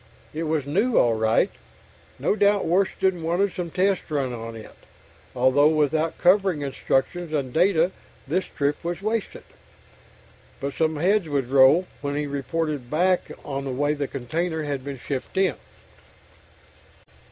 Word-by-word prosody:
It 160 +2 -3
was 155 -3 -1
new 205 - +1
all 120 - +4
right 110 0 +2 0.7
no - - +1
doubt 205 -1 +3
Washington 190 0 +1
wanted 175 +4 0
some 180 -2 -4
tests 190 +2 0
run 140 -5 -1
on 115 -1 -7
it, 110 -1 -11 0.6
although 130 +4 +4
without 155 +1 +1
covering 185 -3 +3
instructions 150 +5 -1
and 140 -5 -2
data 175 0 +3 0.4
this 180 +7 0
trip 145 +2 -2
was 175 +3 -4
wasted. 220 0 -2 1.2
But 140 0 -4
some 160 +3 0
heads 180 +3 +1
would 140 -4 -1
roll 135 +6 +6 0.2
when 145 0 -3
he 150 0 -1
reported 145 -1 -3
back 180 +5 +1
on 140 -1 -4
the - - -3
way 145 +3 0
the 145 -2 -3
container 160 +6 -3
had 140 -3 -3
been 140 0 -6
shipped 130 +6 -5
in. 190 0 +3
155 Hz, 145 wpm, -24 LUFS, 140-180 Hz, 1.2 s, roll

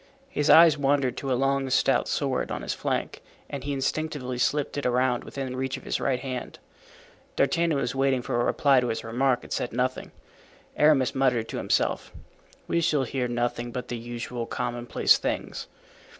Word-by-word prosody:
His 150 - -1
eye 165 0 +9
wandered 140 -2 +1
to 135 - -3
a - - +3
long 135 0 +1
stout - - +2
sword - - -1
on - - -4
his - - -2
flank - - -3 0.3
and 140 - -6
he 145 - -3
instinctively 135 -2 -2
slipped 145 +4 0
it 145 - -3
around 125 0 +1
within 130 -2 -5
reach 130 +1 -2
of 130 - -12
his - - -2
right 130 -2 0
hand. 130 -1 -5 0.8
D'Artagnan 165 -3 +2
was 135 - -1
waiting 135 -2 +1
for 120 - -1
a - - +1
reply 140 0 +3
to 125 - -1
his 115 -1 -3
remark 125 +3 0
and - - -6
said 120 - -2
nothing. 130 +2 -2 0.6
Aramis 145 -4 +4
muttered 125 -4 +1
to - - -4
himself, - - 0 0.6
"We 170 - +1
shall 155 -4 +2
hear 130 0 -2
nothing 120 0 -2
but 125 0 -6
the 120 - -3
usual 120 0 -5
commonplace 120 0 +1
things." - - -3
130 Hz, 180 wpm, -26 LUFS, 120-140 Hz, 0.8 s, eye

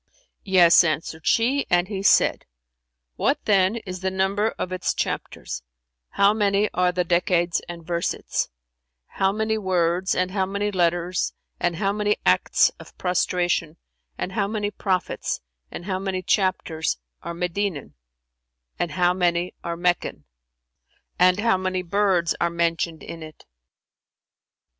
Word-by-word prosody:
"Yes," 180 -4 +6
answered 160 0 -2
she; 260 +5 +2
and 175 +1 +3
he 195 -2 -4
said, 200 - +3 0.7
"What - - +2
then 195 0 +3
is 190 -5 -6
the 190 +1 -1
number 190 +3 +1
of 185 - -3
its 185 0 -1
chapters, - - -4 0.5
how 200 +1 +4
many 205 -1 +1
are 180 0 +2
the 180 0 0
decades 175 0 +1
and 170 -1 -8
versets, 170 0 -2 0.6
how 190 - 0
many 220 +1 -1
words 180 -1 +1
and 185 0 0
how 190 -1 0
many 200 +2 -1
letters 175 -1 0 0.3
and 175 -1 0
how 195 +4 0
many 210 0 +1
acts - - +4
of - - -14
prostration 175 -2 0 0.4
and - - -3
how 200 -1 0
many 205 -1 -2
prophets 185 -3 -2 0.3
and 175 - -8
how 185 -2 -2
many 190 -1 -3
chapters 180 -5 0 0.2
are 170 +1 -6
Medinan 180 - -2 0.9
and 170 -4 -1
how 175 +2 +3
many 175 -1 0
are 170 0 -3
Meccan 175 - -1 0.9
and 180 +2 +5
how 225 -2 +3
many 185 0 -2
birds 185 -2 +2
are - - +3
mentioned 170 -1 -1
in 165 - -8
it?" 155 -1 -11
185 Hz, 140 wpm, -24 LUFS, 170-200 Hz, 0.9 s, Yes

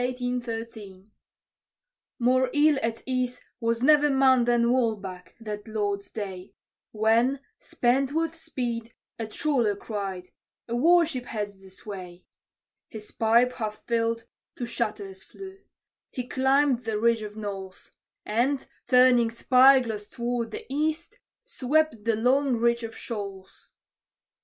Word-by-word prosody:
_ 230 -5 -4 1.1
More 255 +1 +2
ill 295 -1 +4
at 230 0 -3
ease 255 -1 -1 0.2
was 230 0 -1
never 295 +1 +5
man 265 -3 +4
than 240 0 +3
Walbach, 205 -7 -2
that 210 -2 -6
Lord's 205 -2 -2
day, 190 -3 -7 0.3
When, 230 +5 +2 0.2
spent 260 +3 0
with 325 +1 -1
speed, 240 -8 -4 0.2
a 225 - -3
trawler 240 -4 0
cried, 195 -3 -5 0.4
"A 235 - -2
war 335 +7 +5
ship 260 -6 -5
heads 205 -4 -5
this 190 -1 -15
way!" 185 -4 -8 0.6
His 210 -1 -10
pipe, 235 +3 +3
half 215 -3 -5
filled, 230 -1 0 0.3
to 245 - -4
shatters 210 -5 -4
flew; 385 - -11 0.5
he 250 -1 -5
climbed 265 0 +2
the 225 -3 -3
ridge 230 0 +2
of 210 0 -8
knolls; 195 -3 -7 0.3
And, 250 +6 0 0.2
turning 250 -2 +5
spy 260 +3 +5
glass 215 -4 -5
toward 235 0 -3
the - - -7
east, 310 +4 -2 0.2
swept 310 - 0
the 230 -1 +2
long 255 +4 +2
reach 235 +1 +2
of 225 -1 -7
Shoals. 195 -4 -7
235 Hz, 130 wpm, -26 LUFS, 215-260 Hz, 1.1 s, never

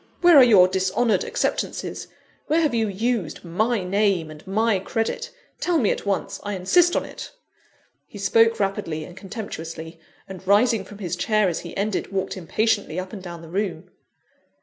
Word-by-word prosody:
Where 350 -2 +7
are 270 - +10
your 205 -7 +7
dishonoured 190 +3 +1
acceptances? - - -2 0.4
Where 320 +2 +3
have 305 -6 +1
you 225 -2 +1
used 205 -4 -2
my 215 +5 0
name 190 -4 +1
and 155 0 -12
my 215 +1 +2
credit? 225 +4 -2 0.3
Tell 350 -2 +1
me 225 -9 +2
at - - -4
once 195 -1 -1
I 205 0 -4
insist 345 - +3
on - - 0
it!" - - -8 0.8
He - - -11
spoke 225 +3 +3
rapidly 195 -6 -2
and 175 - -11
contemptuously, 165 -5 -7 0.3
and 190 -1 -10
rising 210 0 +3
from 205 - -12
his 185 -5 -3
chair 215 -3 +2
as 165 - -2
he 170 - -9
ended, 200 0 -2
walked 190 -1 -2
impatiently 195 -1 0
up 185 0 -7
and 200 - -7
down 170 -2 -8
the - - -10
room. 185 -1 -3
200 Hz, 170 wpm, -23 LUFS, 180-225 Hz, 0.8 s, are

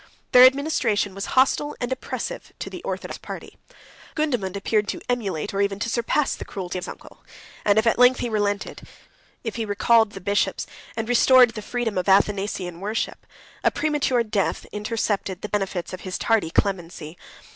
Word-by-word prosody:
Their 250 0 +9
administration 255 -8 0
was 195 +1 -5
hostile 280 +3 +3
and 245 +1 -3
oppressive 260 - -5
to - - -6
the - - -7
orthodox - - -5
party. - - -9 0.6
Gundamund 245 - -1
appeared 210 +1 0
to - - -4
emulate, 205 -11 -2
or 200 - 0
even 200 -1 0
to 230 +3 -2
surpass, 240 +5 +1
the - - -6
cruelty 185 -2 -5
of - - -6
his - - -7
uncle; - - -15 0.4
and, 205 0 +3
if 220 - +4
at 230 - +2
length 250 +1 +6
he - - -1
relented, 205 -2 -2 0.6
if 225 -2 -4
he 230 - -1
recalled 220 +1 +3
the - - -7
bishops, 200 +2 0 0.3
and 225 0 -2
restored 245 0 +6
the 220 -1 -7
freedom 225 -3 -2
of 185 - -2
Athanasian 195 -3 +1
worship, 210 +4 -3 0.4
a - - +5
premature 290 -5 +1
death 210 -3 -1
intercepted 210 -3 -2
the 210 - -4
benefits 195 -4 -2
of 185 - -6
his 185 0 -4
tardy 225 -8 +1
clemency. 170 -4 -2
210 Hz, 175 wpm, -24 LUFS, 195-240 Hz, 0.6 s, Their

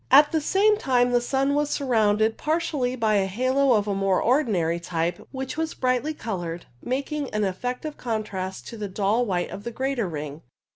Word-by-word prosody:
At 290 +3 +7
the 320 - +1
same 415 +7 +3
time 245 -2 +2
the 245 0 +3
sun 270 +3 +1
was 295 0 +1
surrounded 220 -5 +2
par 310 +2 0
tially 260 -7 -2
by 215 -2 +3
a 195 -1 +2
halo 255 +6 +2
of 210 -2 +2
the 205 - -1
more 195 -1 +2
ordinary 200 - +2
type, 170 0 -2
which 265 +2 -5
was 320 0 -2
brightly 255 +4 0
coloured, 175 - -4 0.2
making 280 +3 -2
an 215 - +1
effective 250 +10 -3
contrast 200 -5 -4
to 230 - -8
the 210 -1 -3
dull 210 +5 +1
white 180 -3 -1
of 200 - -7
the - - -3
greater 255 -4 -1
ring. 150 -1 -6
240 Hz, 190 wpm, -25 LUFS, 195-275 Hz, 0.2 s, At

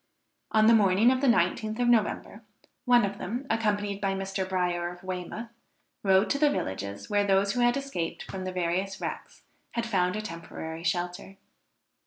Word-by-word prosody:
On 215 0 +4
the 230 - +7
morning 210 +2 +5
of 260 0 0
the 280 - +2
19th 220 -2 +2
of 245 - +2
November, 230 -3 +1 0.4
one 245 -3 +5
of 200 0 -5
them, 240 +8 -4
accompanied 205 -2 0
by 195 -1 0
Mr. 195 0 -3
Bryer 175 -2 0
of 175 +1 -13
Weymouth, 185 +5 -5 0.5
rode 190 0 +4
to 280 - +1
the 300 0 +5
villages 100 - -4
where 205 -1 +2
those 200 0 +2
who 245 - -2
had 240 +2 +3
escaped 275 -12 -4
from 190 -1 -6
the 185 - -3
various 185 +2 -1
wrecks - - -6 0.3
had 235 -1 -1
found 185 -4 +1
a 215 - -2
temporary 165 -2 -7
shelter. 180 +3 -2
195 Hz, 175 wpm, -28 LUFS, 180-225 Hz, 0.5 s, the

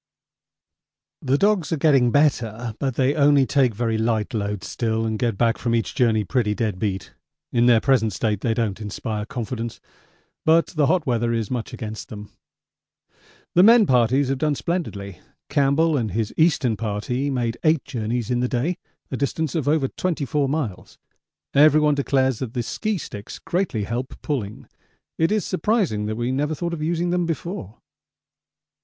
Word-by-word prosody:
The 135 +1 +1
dogs 200 -2 +2
are 165 - +1
getting 135 -5 +4
better, 120 -5 +1
but 135 -3 -1
they 130 +1 +2
only 145 -2 +4
take 130 -5 +2
very 115 0 -1
light 110 +1 0
loads 105 -2 -3
still 115 -2 -1
and 110 -1 -2
get 115 -5 0
back 115 0 +2
from 115 -1 0
each 115 - -1
journey 115 -5 +2
pretty 105 -1 0
dead 105 -5 -2
beat. 100 -3 -3 0.4
In 120 0 +3
their 120 -2 +6
present 125 -3 +2
state 105 0 -1
they 115 -1 0
don't 110 -3 -2
inspire 105 +1 -4
confidence, 115 -1 -5 0.6
but 165 +1 +4
the 150 -5 +1
hot 180 0 +2
weather 120 -2 0
is 115 -3 -2
much 120 -3 -3
against 110 +3 -7
them. 105 -3 -9 1.2
The 175 - +6
men 225 +2 +7
parties 130 0 +3
have 135 -1 -1
done 150 0 +1
splendidly. 100 - -4 0.3
Campbell 145 +3 +2
and 115 -6 0
his 110 0 -2
Eastern 150 -8 +2
Party 115 +6 -2
made 120 -4 -2
eight 155 -2 +2
journeys 120 -2 -3
in 120 - +1
the 125 - +1
day, 145 +9 -1 0.3
a 130 - -2
distance 145 +2 -2
over 150 -2 +1
24 150 -4 -1
miles. 135 - -4 0.6
Everyone 150 +1 +5
declares 135 -3 +1
that 125 -3 -5
the 120 - -1
ski 215 - -2
sticks 105 - -8
greatly 180 - -2
help 120 +5 -4
pulling; 110 -8 -4 0.5
it 165 +4 +2
is 215 -1 +1
surprising 185 - 0
that 110 - -2
we 120 +2 -1
never 150 +4 -1
thought 170 +3 -3
of 160 - -4
using 170 +2 0
them 175 -1 0
before. 165 - -5
125 Hz, 165 wpm, -23 LUFS, 110-150 Hz, 1.2 s, men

